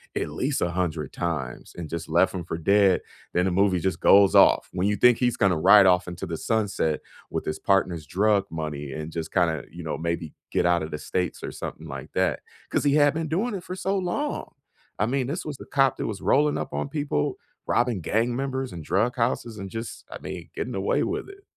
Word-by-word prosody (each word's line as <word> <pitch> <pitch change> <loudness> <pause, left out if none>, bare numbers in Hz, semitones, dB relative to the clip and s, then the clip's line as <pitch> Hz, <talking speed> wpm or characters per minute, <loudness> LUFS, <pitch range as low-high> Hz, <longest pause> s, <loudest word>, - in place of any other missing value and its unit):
at - - -1
least 135 - -1
a 90 - +1
hundred 85 -5 -2
times 80 -8 -4
and 85 -3 -6
just 85 0 -5
left 85 +4 +3
him 90 -3 -4
for 80 - -4
dead, 100 +2 +4 0.3
then 90 +1 +2
the 95 - +1
movie 95 0 +3
just 95 -1 -1
goes 100 -1 +6
off. - - +6
When 90 +2 0
you 105 - +2
think 125 +2 +5
he's 120 -2 +1
gonna 95 -5 +3
ride 100 +4 +8
off 90 -1 +4
into 90 0 -5
the 85 -1 -4
sunset 105 -8 0 0.3
with - - -3
his 75 - -3
partner's 90 -5 +1
drug 100 +3 +2
money 75 -3 -5
and 75 +1 -5
just 80 -1 -5
kinda, 85 -5 +1
you 85 +1 -9
know, 80 - -3
maybe 85 -1 -3 0.2
get - - +1
out 85 -1 +3
of 80 - -5
the 75 - -3
States 90 +3 -3
or - - -4
something 80 - -7
like 70 -2 -8
that, - - +1 0.3
'cause - - +1
he 145 -1 +3
had 145 -1 +5
been 160 0 -2
doing 205 +9 -1
it 180 - -6
for 180 - -6
so 190 +1 -1
long. 190 +12 -2 0.5
I 105 - +3
mean, 130 +1 0
this 165 +7 -3
was 150 -3 -5
the - - -10
cop 135 -1 +2
that - - -2
was 105 -3 -5
rolling 150 +1 +3
up - - -5
on - - -2
people, 145 - -1 0.3
robbing 120 -5 +1
gang 115 +8 0
members 130 -4 -3
and 85 - -7
drug 110 - +1
houses 115 -1 -1
and 95 0 -6
just, 115 +3 -6
I - - -6
mean, - - -7
getting - - -3
away - - +1
with - - -3
it. 395 0 -14
95 Hz, 230 wpm, -25 LUFS, 85-125 Hz, 0.5 s, ride